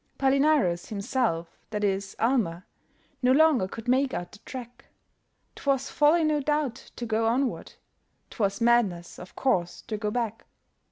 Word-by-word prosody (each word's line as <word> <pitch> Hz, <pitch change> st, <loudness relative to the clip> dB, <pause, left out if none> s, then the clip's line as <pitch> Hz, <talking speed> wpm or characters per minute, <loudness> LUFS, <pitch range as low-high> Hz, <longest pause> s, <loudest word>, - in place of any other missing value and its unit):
Palinurus 270 Hz, -, +2 dB
himself 200 Hz, -5 st, -2 dB
that 210 Hz, -1 st, -3 dB
is 195 Hz, -1 st, -1 dB
Almer 215 Hz, -8 st, 0 dB, 0.6 s
No 250 Hz, 0 st, +4 dB
longer 285 Hz, -7 st, +4 dB
could 225 Hz, +4 st, -9 dB
make 260 Hz, +2 st, +2 dB
out 175 Hz, -, -5 dB
the 205 Hz, -, -14 dB
track; 245 Hz, 0 st, -9 dB, 0.7 s
'Twas 275 Hz, -1 st, -1 dB
folly, 310 Hz, +3 st, +4 dB
no 305 Hz, -1 st, +2 dB
doubt, 290 Hz, -3 st, -2 dB
to 240 Hz, -, -5 dB
go 225 Hz, 0 st, +1 dB
onward; 250 Hz, +3 st, -1 dB, 0.6 s
'Twas 200 Hz, -2 st, -1 dB
madness, 220 Hz, -8 st, +2 dB
of 180 Hz, -, -11 dB
course, 180 Hz, -10 st, 0 dB
to 220 Hz, -2 st, -4 dB
go 210 Hz, 0 st, -2 dB
back. 225 Hz, -1 st, -3 dB
235 Hz, 145 wpm, -27 LUFS, 200-270 Hz, 0.7 s, No